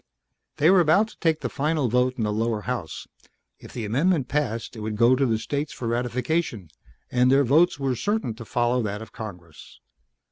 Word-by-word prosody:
They 155 +5 +5
were 190 - +6
about 175 +7 +3
to - - -18
take 160 -3 +1
the - - -1
final 150 -1 0
vote 125 +2 +1
in 115 - -1
the 105 -1 0
lower 110 0 -1
house. 120 -9 -5 0.5
If - - -13
the 115 -3 -5
amendment 140 - +1
passed 125 -7 -2
it - - -8
would 105 0 -4
go 120 +3 +5
to 135 +1 +1
the 115 -2 +1
states 145 +6 -3
for 120 - -5
ratification, 120 - -2 0.4
and 125 +1 +3
their 140 +1 +5
votes 150 +6 +3
were 135 -2 0
certain 205 - -1
to 115 - -8
follow 120 +2 +1
that 105 -1 -4
of - - -14
Congress. 90 -7 -10
125 Hz, 200 wpm, -24 LUFS, 110-150 Hz, 0.5 s, were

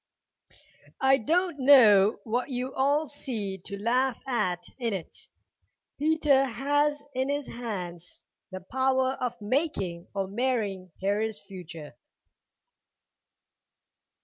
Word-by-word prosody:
"I 270 0 +5
don't 335 - 0
know 225 -7 +6
what 245 +4 -2
you 255 0 -3
all 285 +3 +2
see 225 -9 -2
to 200 - -6
laugh 250 +4 +1
at 210 -9 0 0.2
in 235 -3 -1
it. 185 -4 -7 0.7
Peter 300 -3 +3
has 290 +3 0
in 260 +1 -1
his 285 0 -1
hands 180 -9 -6 0.3
the 185 -1 -7
power 260 +4 +1
of 250 -2 -2
making 205 - -2
or 195 -1 -1
marring 205 -5 -2
Harry's 210 +2 0
future." 180 - -10
245 Hz, 105 wpm, -27 LUFS, 195-270 Hz, 0.7 s, know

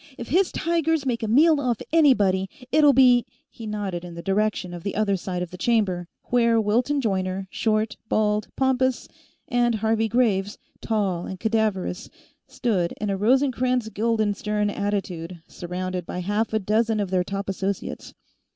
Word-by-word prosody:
"If 235 - -7
his 360 +5 +2
tigers 325 -2 0
make 240 -3 -1
a 220 - -2
meal 300 +7 +5
off 245 -4 0
anybody, 205 - +4 0.2
it'll 295 -1 +6
be 250 -3 +5
" - - -43
He 225 - -9
nodded 200 -5 -3
in 175 -1 -9
the 170 - -8
direction 200 -2 0
of 175 - -7
the 200 - -4
other 205 -2 +1
side 180 -1 -3
of 180 - -8
the 180 - -10
chamber, 190 -5 +1 0.2
where 235 -2 +4
Wilton 240 +7 +1
Joyner, 190 -3 -2
short, 215 0 0
bald, 210 0 +1
pompous, 260 -1 +1 0.4
and 240 -1 +2
Harvey 220 +1 +1
Graves, 210 -4 +1 0.2
tall 195 -6 -1
and 190 - -7
cadaverous, 220 -3 -1 0.4
stood 190 -9 -1
in 210 -1 -1
a - - 0
Rosencrantz 250 +1 +1
Guildenstern 210 -1 0
attitude, 185 -4 -3
surrounded 180 0 -5
by 180 - -4
half 205 +4 -1
a 220 - +1
dozen 220 +2 +1
of 200 -3 -2
their 185 -1 +2
top 195 +2 -4
associates. 195 0 -4
210 Hz, 160 wpm, -24 LUFS, 190-240 Hz, 0.4 s, it'll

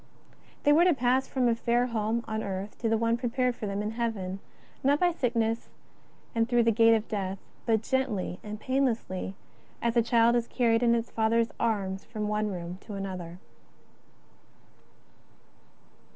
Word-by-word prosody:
They 290 - +5
were 325 +3 +6
to 355 -4 +4
pass 255 +1 +2
from 255 -2 +1
a 235 - +4
fair 235 +1 +1
home 230 0 -1
on 220 0 -2
earth 195 0 -4
to 230 - 0
the 225 - +3
one 230 +1 +1
prepared 250 0 0
for 215 - -5
them 200 +1 -2
in 210 - -2
Heaven, 215 -5 -3 0.4
not 285 +2 +3
by 355 -1 +3
sickness 230 -7 -1 0.6
and 230 -1 +1
through 240 -1 +4
the 230 - +4
gate 230 +1 +5
of 220 -1 -2
death, 195 -2 -3 0.3
but 225 -1 +2
gently 235 -10 -1
and 210 0 -6
painlessly 235 -7 -1 0.4
as 235 0 0
a 235 - +5
child 235 0 +4
is 235 -1 +1
carried 230 -2 +2
in 235 -1 +4
its 230 0 -2
father's 225 +1 +2
arms 195 -4 -1
from 215 -2 -4
one 210 0 0
room 180 -1 -6
to 210 - -6
another. 185 -3 -5
230 Hz, 165 wpm, -28 LUFS, 210-240 Hz, 0.6 s, were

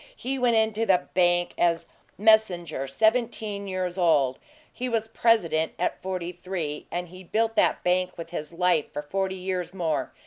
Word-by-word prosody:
He 265 +2 -3
went 245 -2 +3
into 220 0 +1
the 180 -2 +3
bank 175 -1 +2
as 170 -1 +2 0.3
messenger, 185 -9 +3
seventeen 215 - 0
years 185 -1 -3
old; 145 -7 +3 0.3
he 255 0 -3
was 225 -2 0
president 180 -9 +2
at 180 - -2
forty 185 -2 -3
three, 175 -4 -5
and 175 0 -4
he 185 +1 -11
built 225 +5 0
that - - +2
bank 180 0 +1
with 165 0 -8
his 155 -3 -5
life 170 -3 +1
for 150 - -5
forty 190 +4 -2
years 185 -1 -3
more. 165 -4 -1
180 Hz, 165 wpm, -26 LUFS, 170-215 Hz, 0.3 s, went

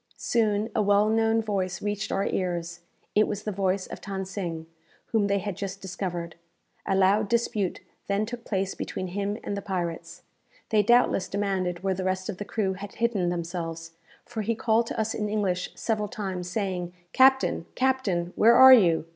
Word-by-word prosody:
Soon 215 -2 +1
a - - +2
well 205 +1 +3
known 225 0 +2
voice 185 -4 -2
reached 205 0 -3
our 195 - 0
ears. 175 -2 -2 0.3
It 215 +1 +4
was 205 -1 -4
the 215 - -2
voice 190 -1 0
of - - -9
Than 195 -2 -4
Sing, 175 -4 -5 0.5
whom 215 -3 +2
they 200 0 +2
had 200 -1 -3
just 195 +1 -5
discovered. 175 -3 -5 0.5
A 195 - +2
loud 195 +2 +3
dispute 220 -5 0 0.3
then 200 +2 +1
took 240 +1 -7
place 195 -3 -1
between 185 - -5
him 200 +3 -2
and 205 - -3
the 200 - -4
pirates. 170 -2 -4 0.5
They 215 -1 +4
doubtless 235 -2 +3
demanded 190 -3 -2
where 195 -1 +1
the 185 0 -4
rest 185 +1 -2
of 195 - -4
the 205 - -4
crew 200 -3 -1
had 195 +1 -9
hidden 225 -7 +1
themselves; 165 -1 -4 0.3
for 235 -2 -4
he 225 +2 -1
called 225 +1 +2
to - - -4
us 220 0 0
in 210 -1 -2
English 190 -4 -1
several 215 -2 -1
times, 190 -3 -5
saying, 180 -3 -3 0.2
"Captain, 265 -9 +4
captain! 210 -10 0
where 230 +2 +6
are 260 +1 +10
you? 170 -10 +5
200 Hz, 180 wpm, -26 LUFS, 180-215 Hz, 0.5 s, are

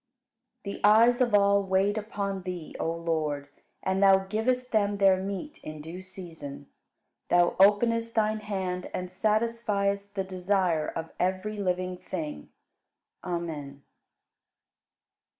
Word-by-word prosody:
46. 200 - -6
The - - +5
eyes 235 +4 +5
of 240 -4 +3
all 200 0 +5
wait 195 +1 +1
upon 200 -3 -3
Thee, 180 -3 -6
O 165 - 0
Lord, 155 -4 -2 0.3
and 190 +1 0
Thou 195 -1 +6
givest 250 +5 -1
them 205 -2 +2
their 190 -1 +4
meat 200 +10 -5
in 155 0 -7
due 165 +5 -8
season: 170 -7 -9 0.6
Thou 175 0 +4
openest 230 +3 +4
Thine 215 -1 +2
hand 190 -3 -3
and 180 0 -4
satisfiest 205 -1 0
the 195 - 0
desire 185 -3 0
of 165 0 -5
every 190 +4 -1
living 185 -1 -1
thing. 155 - -6 0.7
Amen. 155 -6 -5
190 Hz, 125 wpm, -28 LUFS, 180-210 Hz, 0.7 s, Thou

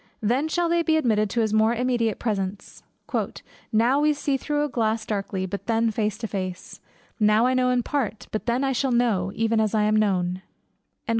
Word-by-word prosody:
Then 250 +8 +1
shall 345 +2 0
they 340 0 +2
be 320 -1 +2
admitted 215 -7 +1
to 235 - 0
his 215 -1 0
more 220 +2 +3
immediate 240 -3 0
presence: 200 -3 -4 0.9
"Now 235 +6 +3
we 300 +1 +3
see 285 -1 -1
through 295 +2 -1
a - - 0
glass 225 -4 -1
darkly; 195 -3 -3
but 195 +2 -6
then 230 0 +2
face 210 -1 -1
to 225 - -4
face: 185 -3 -5 0.4
now 215 +2 +4
I 255 - +2
know 255 0 +2
in 250 -1 +1
part; 240 -7 -2
but 215 - -4
then 240 +2 +1
shall 260 0 0
I - - +3
know, 200 -6 +1
even 225 0 +1
as 220 0 +1
I 215 - +3
am 215 0 +2
known." 185 -4 +1
225 Hz, 200 wpm, -24 LUFS, 210-250 Hz, 0.9 s, now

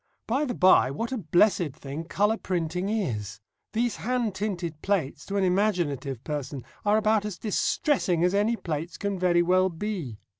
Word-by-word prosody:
By 270 +6 +1
the 245 -4 -3
bye, 185 -8 +5
what 230 - -3
a 260 - -2
blessed 175 -3 +2
thing 140 +5 -7
colour 210 +6 +1
printing 180 0 -2
is! 110 - -2 0.3
These 235 +1 0
hand 240 -3 -1
tinted 180 -6 -3
plates, 190 -9 -1
to 200 - -2
an 195 - +2
imaginative 175 - 0
person, 140 -3 -4 0.2
are 210 +1 +3
about 215 -1 +2
as 210 -4 -5
distressing 210 - +1
as 180 +1 +3
any 210 +4 +2
plates 165 -4 -4
can 200 -2 -2
very 175 -1 +3
well 185 +2 +3
be. 170 - -4
185 Hz, 165 wpm, -27 LUFS, 160-210 Hz, 0.3 s, bye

